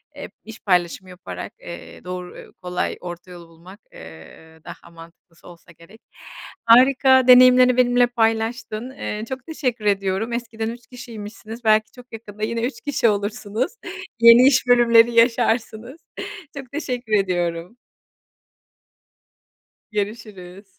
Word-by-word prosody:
eee, - - -9
iş 225 +1 -12
paylaşımı 180 0 -1
yaparak, 180 0 -9
eee, - - -11
doğru, 180 0 -9
kolay, 180 0 -3
orta 175 0 -9
yolu 175 -1 -12
bulmak, 175 +5 -16
eee, 80 - -14
daha 170 - -12
mantıklısı 165 +1 -17
olsa 170 0 -16
gerek. 170 +7 -19 0.6
Harika 260 +2 +5
deneyimlerini 250 0 +6
benimle 245 -1 +3
paylaştın. 225 0 -2
Eee, 215 -5 -6
çok 260 -1 -7
teşekkür 250 -9 -4
ediyorum. 200 +3 -1
Eskiden 230 -2 -4
3 235 0 -10
kişiymişsiniz 225 -2 -10
belki 215 -1 +2
çok 250 -1 -17
yakında 215 -2 -9
yine 230 +1 -2
3 250 +4 -4
kişi 285 -5 0
olursunuz. 210 +3 -3 0.5
yeni 235 +2 +8
iş 265 -1 +2
bölümleri 240 -1 +5
yaşarsınız. 230 +1 0 0.6
Çok 265 -3 -9
teşekkür 250 -6 -5
ediyorum. 180 0 -1 2.2
Görüşürüz. 205 -3 -6
225 Hz, 120 wpm, -21 LUFS, 185-245 Hz, 2.2 s, yeni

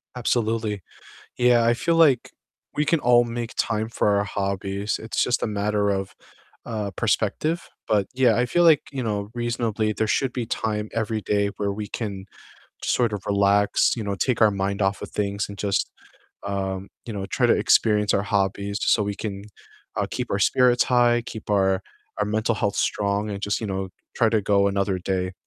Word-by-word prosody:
Absolutely, 110 -4 -1 0.6
yeah, 120 -1 +4
I 120 - +4
feel 165 +8 0
like 145 -7 +4 0.4
we 150 - +1
can 165 0 +2
all 120 -1 +5
make 120 0 -5
time 110 0 0
for 105 -3 +1
our 100 - +2
hobbies, 100 0 -2
it's 110 +1 -2
just 125 -1 +1
a - - +1
matter 105 0 0
of, 95 -1 -2 0.5
uh, 105 -4 -3
perspective, 165 +2 0 0.2
but 105 -3 +2
yeah, 125 -4 +3
I 125 - +2
feel 175 +7 +2
like, 160 -3 +6
you 135 -3 -3
know, 105 -2 -2
reasonably 115 -2 -1
there 110 - -1
should 130 +3 +1
be 125 -3 -3
time 105 -1 -2
every 110 -1 -1
day 100 0 +1
where 100 -1 -1
we 105 0 -5
can 100 -4 -5 0.6
sort 120 -3 +1
of 100 - -6
relax, 100 0 +3
you 115 - -3
know, 100 -1 -2
take 120 +1 +1
our 110 - +6
mind 100 0 -2
off 95 +1 0
of - - -7
things 100 -1 -2
and 100 - -8
just, 100 -1 -1 0.5
um, 95 -1 -3 0.2
you 115 - -6
know, 100 -2 -4
try 95 - +1
to - - +5
experience 105 -2 +3
our 100 - +2
hobbies 100 0 -1
just - - +3
so 105 - +2
we 100 0 -3
can, 100 -2 -5 0.5
uh, - - +1
keep - - -4
our - - 0
spirits 125 -1 +4
high, 120 -1 +3
keep 110 -3 -8
our 95 -1 +2 0.4
our 105 - 0
mental 110 +2 0
health 100 -1 -1
strong, 100 +1 0
and 100 -1 -5
just, 100 0 -1
you 110 - -4
know, 95 -1 -3 0.3
try 115 -2 +3
to 110 -1 +1
go 100 0 +3
another 100 -1 0
day. 90 0 -2
105 Hz, 195 wpm, -24 LUFS, 100-115 Hz, 0.6 s, like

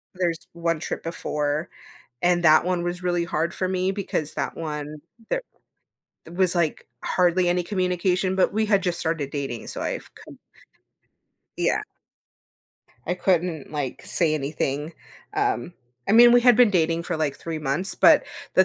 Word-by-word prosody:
there's 175 -3 -1
1 170 -1 -1
trip - - -5
before, 150 -1 -2 0.5
and 175 0 +2
that 155 0 +6
one 180 -1 0
was 175 +1 -4
really 175 -1 0
hard 170 +1 -1
for 185 - -1
me 185 0 0
because 190 -6 -3
that - - -3
one 150 -2 -5 0.3
there - - 0 0.9
was, 185 0 +2
like, 170 -3 -1 0.2
hardly 180 0 +2
any 175 0 +1
communication, 185 0 0
but 190 - +3
we 220 +1 +1
had 200 -3 +2
just 175 -1 -1
started 160 -4 -2
dating, 135 -5 -4
so - - -4
I've - - -4
cou - - -13 1.2
Yeah. - - +1 1.2
I 180 - 0
couldn't, 175 -4 0
like, 145 -4 -4
say 160 -3 +2
anything. 145 +1 -2 0.4
Um, 400 - -1 0.4
I - - +3
mean, 240 +2 +8
we 245 - +6
had 245 -1 +6
been 245 -3 +6
dating 165 -3 +1
for, 175 - -2
like, 150 -3 -1
3 165 -1 -5
months, 150 +6 -1
but, - - +6 0.3
the 185 - +6
175 Hz, 160 wpm, -24 LUFS, 155-185 Hz, 1.2 s, mean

